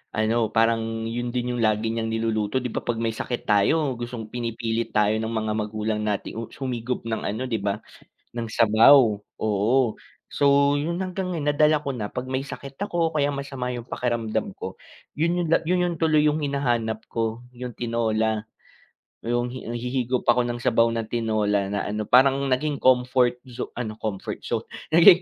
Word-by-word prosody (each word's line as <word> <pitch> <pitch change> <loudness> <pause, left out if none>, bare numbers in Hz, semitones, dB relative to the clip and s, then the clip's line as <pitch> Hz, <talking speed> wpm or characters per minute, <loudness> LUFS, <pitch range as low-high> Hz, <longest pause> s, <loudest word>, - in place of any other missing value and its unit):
ano 110 +1 +1
parang 115 0 +1
yun 120 +1 -3
din 125 0 -2
yung 120 - -2
lagi 110 +1 +1
niyang 115 -1 -2
niluluto 110 0 0
'di 125 -2 -3
'ba - - -2
'pag 120 -1 -2
may 115 -1 -1
sakit 120 +2 -4
tayo 130 +8 +3
gustong 120 -2 -6
pinipilit 115 -1 -2
tayo 105 0 +2
ng 110 - -2
mga 110 -1 -1
magulang 105 0 -2
natin 105 +1 -2 0.2
humigop 125 -2 -3
ng 110 -1 -2
ano 115 +5 -3
'di 115 -5 -2
'ba 100 0 -1 0.6
ng 115 -1 -4
sabaw, 110 0 +6
oo. 110 +4 +1 0.4
So 140 0 +4
yun 170 +4 -2
hanggang 185 0 -3
ngayon 145 -2 +1
nadala 150 +1 +3
ko 140 - -1
na 105 -5 -4
'pag 125 - -5
may 130 - 0
sakit 140 -1 -9
ako 170 -5 0
kaya 145 -2 +2
masama 140 -3 -4
yung 120 - -6
pakiramdam 120 -3 -2
ko - - -5 0.5
yun 170 +3 +1
yung - - -3
la - - +7
yun 180 0 +2
yung 175 -1 -1
tuloy 155 -2 +4
yung 150 0 +3
hinahanap 120 -6 -1
ko 115 +1 -2
yung 125 -2 -7
tinola. 110 -2 0 0.7
Yung 120 +1 -1
hi 130 - -6 0.2
hihigop 125 +1 -1
ako 120 +1 +4
ng 120 - -2
sabaw 115 -1 +3
na 115 -1 -2
tinola 105 -4 0
na 100 0 -2
ano 105 0 -3
parang 135 +2 +5
naging 140 +3 0
comfort 125 -1 +3
zone 125 -2 -6
ano 110 -3 -3
comfort 105 -3 -4
zone - - -2 0.2
naging 170 +2 +8
120 Hz, 175 wpm, -24 LUFS, 110-135 Hz, 0.7 s, naging